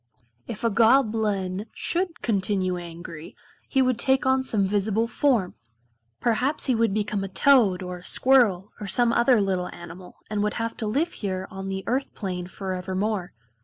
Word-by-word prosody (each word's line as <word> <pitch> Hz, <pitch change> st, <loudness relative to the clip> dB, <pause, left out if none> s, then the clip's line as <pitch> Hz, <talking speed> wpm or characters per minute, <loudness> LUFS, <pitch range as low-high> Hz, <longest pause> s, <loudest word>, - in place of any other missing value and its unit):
If 220 Hz, -1 st, -6 dB
a 230 Hz, -, +2 dB
Goblin 215 Hz, -4 st, +2 dB
should 350 Hz, -1 st, -2 dB
continue 190 Hz, -4 st, 0 dB
angry 170 Hz, -2 st, -9 dB, 0.3 s
he 265 Hz, -2 st, +3 dB
would 255 Hz, -2 st, 0 dB
take 265 Hz, +2 st, +2 dB
on 260 Hz, 0 st, +3 dB
some 215 Hz, -6 st, +1 dB
visible 205 Hz, +3 st, +1 dB
form. 235 Hz, -8 st, +1 dB, 0.7 s
Perhaps 250 Hz, +6 st, 0 dB
he 260 Hz, -, +2 dB
would 230 Hz, -2 st, +2 dB
become 205 Hz, -1 st, -1 dB
a -, -, -3 dB
toad 200 Hz, -4 st, +3 dB
or 180 Hz, 0 st, -5 dB
a -, -, -17 dB
squirrel, 215 Hz, -8 st, +3 dB
or 205 Hz, -, -4 dB
some 240 Hz, +3 st, +2 dB
other 240 Hz, 0 st, +4 dB
little 190 Hz, -3 st, -1 dB
animal, 175 Hz, +1 st, -11 dB
and 210 Hz, -1 st, -2 dB
would 210 Hz, 0 st, -1 dB
have 230 Hz, 0 st, -3 dB
to 220 Hz, -, -3 dB
live 290 Hz, +11 st, 0 dB
here 190 Hz, -2 st, -4 dB
on 195 Hz, 0 st, -6 dB
the 190 Hz, 0 st, -4 dB
Earth 265 Hz, +3 st, -2 dB
plane 180 Hz, -4 st, -4 dB
forevermore. 190 Hz, +1 st, -3 dB
210 Hz, 165 wpm, -25 LUFS, 185-240 Hz, 0.7 s, other